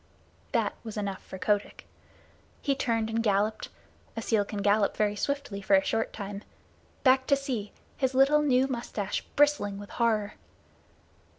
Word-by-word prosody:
That - - +1
was 220 -2 -7
enough 200 -2 -3
for 190 - -9
Kotick. 205 +2 -1 0.8
He 280 - +2
turned 230 -4 0
and 225 +1 -1
galloped 210 0 0 0.5
(a - - -1
seal 215 -2 +2
can 200 0 -5
gallop 205 0 +2
very 210 -1 +1
swiftly 280 -5 -3
for 195 0 +4
a 190 - +4
short 225 0 0
time) 200 -1 -6 0.6
back 260 -1 +4
to 280 - +5
the 275 - -6
sea; 235 -7 -3 0.3
his 260 -1 0
little 275 +3 +5
new 260 -3 +3
mustache 235 -6 -3
bristling 290 -9 +3
with 205 0 -10
horror. 220 -3 +1
220 Hz, 160 wpm, -28 LUFS, 205-260 Hz, 0.8 s, to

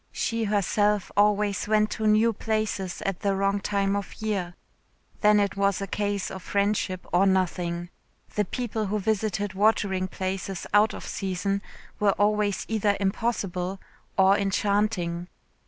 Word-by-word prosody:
She 230 -1 -1
herself 205 -1 +1
always 205 -1 +2
went 215 0 +2
to 220 - -1
new 220 +2 +4
places 215 -4 -2
at 195 -2 -1
the 200 -1 0
wrong 195 +1 +1
time 200 0 0
of 200 -1 -4
year. 195 -5 -2 0.6
Then 210 0 +5
it 200 -1 0
was 200 -1 +1
a 200 - -2
case 205 0 -2
of 190 - -7
friendship, 200 -1 -1
or 185 +3 +5
nothing. 175 -2 0 0.4
The 210 - +1
people 220 0 -3
who 210 +2 0
visited 205 -1 -1
watering 195 -2 +2
places 190 0 -4
out 210 +1 +4
of - - -8
season 195 +1 -2 0.4
were 205 -1 +3
always 205 -1 +1
either 210 -2 +1
impossible 195 -2 -1 0.4
or 190 0 +6
enchanting. 200 -3 0
200 Hz, 140 wpm, -26 LUFS, 190-210 Hz, 0.6 s, or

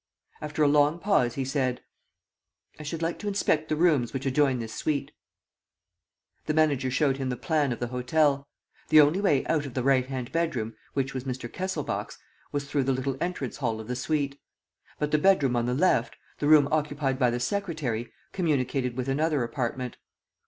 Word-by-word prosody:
After 150 0 -1
a - - +5
long 145 +2 +4
pause 170 - +1
he 135 - -2
said: 130 -2 -1 1.0
"I - - -7
should 160 +2 -4
like 165 +1 -2
to 210 - -5
inspect 160 -6 +1
the 155 - +1
rooms 150 -7 +2
which 135 0 -4
adjoin 135 -1 +2
this 115 -2 -5
suite." 145 +2 -2 1.4
The 155 - 0
manager 145 -5 +2
showed 135 +1 +1
him 135 -1 -2
the 125 - -2
plan 150 -4 0
of 120 - -3
the 120 - -3
hotel. 140 +3 +1 0.4
The 155 - +7
only 150 +6 +5
way 150 -10 +2
out 150 -3 0
of 130 - -10
the 130 - 0
right 130 -1 +3
hand 130 -2 -5
bedroom, 140 -10 -1 0.2
which 135 -1 -1
was 130 -1 -5
Mr. 130 -2 -4
Kesselbach's, 185 +1 -4 0.3
was 145 -1 -2
through 140 -2 0
the 135 - +2
little 130 +1 -2
entrance 180 +1 -3
hall 115 -5 -1
of 110 - -8
the 125 - -2
suite. 140 +1 -1 0.6
But 150 0 -2
the 150 - +3
bedroom 150 -8 +3
on 120 0 0
the 125 - 0
left, 185 +7 +2 0.2
the 145 - 0
room 150 -2 +7
occupied 145 -3 0
by 125 -3 +4
the 120 +1 -1
secretary, 145 - -2 0.2
communicated 135 -7 0
with 130 0 -2
another 150 0 +1
apartment. 125 +1 -3
140 Hz, 190 wpm, -27 LUFS, 125-155 Hz, 1.4 s, The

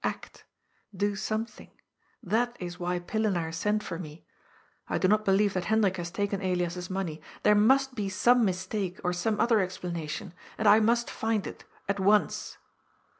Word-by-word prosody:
" - - -25
Act. - - -5 0.5
Do 205 +1 0
something. 215 +2 -4 0.5
That 240 +4 0
is 175 -1 -6
why 180 0 -1
Pillenaar 175 -3 -1
sent 210 +5 0
for 165 - -5
me. 155 -2 -9 0.6
I - - -1
do 185 - +2
not 215 +2 +3
believe 200 +1 +3
that 185 -2 -2
Hen 220 +3 +2
drik 190 -1 +1
has 170 -1 -4
taken 200 +1 -2
Elias's 180 -1 -2
money. 180 -5 -3 0.2
There 210 - +6
must 265 +6 +4
be 205 -5 -3
some 240 +6 +4
mistake, 190 -1 -2
or 180 - 0
some 210 +4 -1
other 230 -2 +4
explanation. 175 -4 -4 0.2
And 220 - +1
I 210 +2 +8
must 235 +2 +2
find 220 -2 -1
it. - - -8 0.2
At 200 0 -1
once." 205 +2 +2
195 Hz, 175 wpm, -28 LUFS, 180-215 Hz, 0.6 s, I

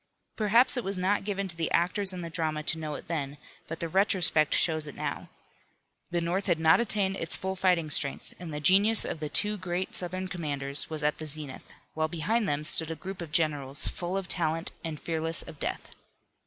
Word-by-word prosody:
Perhaps 230 +5 +3
it 245 - -1
was 195 0 -2
not 190 +3 +1
given 200 -1 -2
to 175 - -9
the 165 -1 -1
actors 185 +3 +2
in 180 -1 -5
the 170 - -6
drama 155 -2 -2
to 160 +1 +1
know 155 -2 -4
it - - -9
then, 145 -4 -3 0.3
but 165 - -6
the 170 - -2
retrospect 180 -4 +3
shows 155 -2 +1
it 145 - -8
now. - - -5 0.8
The 175 0 -1
North 180 +4 -1
had 170 -3 +2
not 160 +4 +5
attained 200 -4 +1
its 165 - -1
full 190 0 -3
fighting 180 -5 +1
strength, 140 -1 +1
and 175 -3 -7
the 150 - -4
genius 200 +7 +6
of - - -4
the 150 -1 -4
two 210 +5 +2
great 180 +1 -3
Southern 185 +1 -1
commanders 145 -5 0
was 155 -2 -4
at 150 0 0
the 155 - -6
zenith, 150 -2 -6 0.2
while 155 0 0
behind 195 +8 -1
them 145 +1 -1
stood 160 0 +4
a 165 - -3
group 190 +3 -7
of 165 -3 -7
generals, 145 -3 0
full 180 +2 -3
of 195 -2 -4
talent 165 -1 0
and 160 -3 -5
fearless 165 0 -2
of 155 -3 -12
death. - - -5
170 Hz, 210 wpm, -28 LUFS, 155-190 Hz, 0.8 s, genius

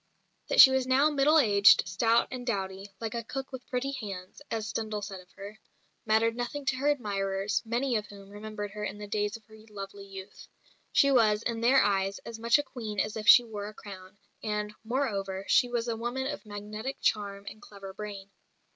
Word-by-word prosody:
That - - 0
she 265 - +11
was 265 -1 +1
now 275 +4 +4
middle 295 +2 +4
aged, 200 - +6
stout 225 +6 +2
and 255 -1 -5
dowdy 195 -4 -3
"like 225 -2 -4
a 235 -1 -3
cook 270 +4 -6
with 260 -2 -9
pretty 260 +2 -2
hands," 195 -5 -7
as 220 -1 -3
Stendhal 215 -2 -3
said 195 -2 -6
of 180 - -17
her 205 +2 -10 0.5
mattered 225 +1 +3
nothing 245 +4 -4
to 270 - +1
her 280 +3 -1
admirers, 200 -6 -1
many 240 +3 0
of 210 -1 -1
whom 200 -1 -13
remembered 205 0 -6
her 210 +1 -6
in 205 -1 -4
the 210 - -7
days 205 +1 -2
of 220 - -25
her 220 +1 -16
lovely 200 -1 -8
youth. 195 0 -10 0.4
She 280 - +4
was, 220 -4 +3
in 230 -1 -2
their 255 +2 +5
eyes, 195 -1 +1
as 230 -1 -7
much 235 +3 +4
a 290 - -1
Queen 225 -7 -6
as 210 - -1
if 215 -1 -5
she 245 - +9
wore 210 -3 -6
a 215 - -10
crown; 190 -2 -11 0.2
and, 210 -1 -3
moreover, 200 -6 -2
she 245 - +4
was 240 -1 -2
a 230 - -1
woman 240 +3 -3
of 290 -5 -5
magnetic 210 +5 -6
charm 200 -1 -1
and 215 - -9
clever 195 -2 -10
brain. 200 -1 -8
215 Hz, 205 wpm, -29 LUFS, 200-245 Hz, 0.5 s, she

